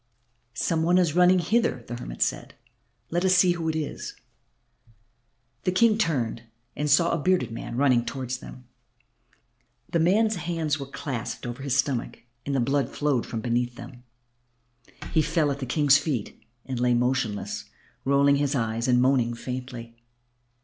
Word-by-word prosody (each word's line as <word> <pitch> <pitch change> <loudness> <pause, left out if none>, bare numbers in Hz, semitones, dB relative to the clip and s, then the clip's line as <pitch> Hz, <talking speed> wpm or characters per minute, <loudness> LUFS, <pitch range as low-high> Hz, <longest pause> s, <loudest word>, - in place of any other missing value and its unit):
"Some 165 -2 0
one 175 +2 +3
is 175 -5 +2
running 180 +2 +5
hither," 200 - +1
the 120 - -6
hermit - - -2
said. - - -3 0.6
"Let 175 +2 0
us 185 -1 +4
see 180 0 +5
who 165 -2 -2
it 160 - -2
is." 155 -2 -4 1.5
The 185 - +1
King 215 +3 +3
turned 130 - 0 0.3
and 150 +1 -1
saw 170 +4 +4
a 170 - 0
bearded 185 -3 +1
man 115 +1 -6
running 130 -3 +3
towards 130 0 -4
them. 125 - -11 1.3
The 170 - +2
man's 210 +5 +3
hands 165 -3 -2
were 140 - -6
clasped 135 -4 -5
over 120 +2 -6
his 140 -1 0
stomach 135 -5 -1 0.2
and 140 - -1
the - - +2
blood 135 +1 +1
flowed 145 -5 0
from 115 - -4
beneath 120 +1 -1
them. 120 +1 -11 1.1
He 160 - +3
fell 155 -2 +1
at 140 - -4
the 130 - -4
King's 145 +1 +4
feet 140 -8 -4 0.2
and 130 -2 -4
lay 125 0 +3
motionless, 125 -4 -1 0.4
rolling 140 +1 +4
his 145 0 0
eyes 115 -1 -1
and 125 -1 +4
moaning 125 -3 +2
faintly. 125 -1 -7
140 Hz, 160 wpm, -26 LUFS, 125-165 Hz, 1.5 s, running